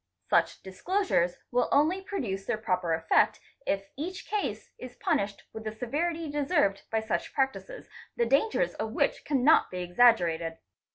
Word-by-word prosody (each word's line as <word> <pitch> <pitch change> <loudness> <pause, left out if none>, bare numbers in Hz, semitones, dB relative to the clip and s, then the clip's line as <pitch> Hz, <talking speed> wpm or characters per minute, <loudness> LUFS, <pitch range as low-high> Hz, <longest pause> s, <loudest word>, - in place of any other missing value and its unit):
Such 170 0 +2
dis 190 0 -11
closures 365 - +1 0.2
will 245 0 +1
only 320 +7 +3
produce 220 - -4
their 240 - 0
proper 180 -6 0
effect 160 0 +2 0.3
if 195 0 -1
each 360 +7 -5
case 420 -1 -3
is 255 -1 -9
punished 200 0 -1
with 220 - -7
the 215 - -3
severity 315 +9 -2
deserved 285 - +1
by 220 0 0
such 220 0 -3
practices, 270 - -2 0.3
the 235 - +2
dangers 435 - +2
of - - -4
which - - 0
cannot 285 +2 +4
be 180 -1 -4
exaggerated. 175 -5 +3
240 Hz, 155 wpm, -28 LUFS, 190-315 Hz, 0.3 s, cannot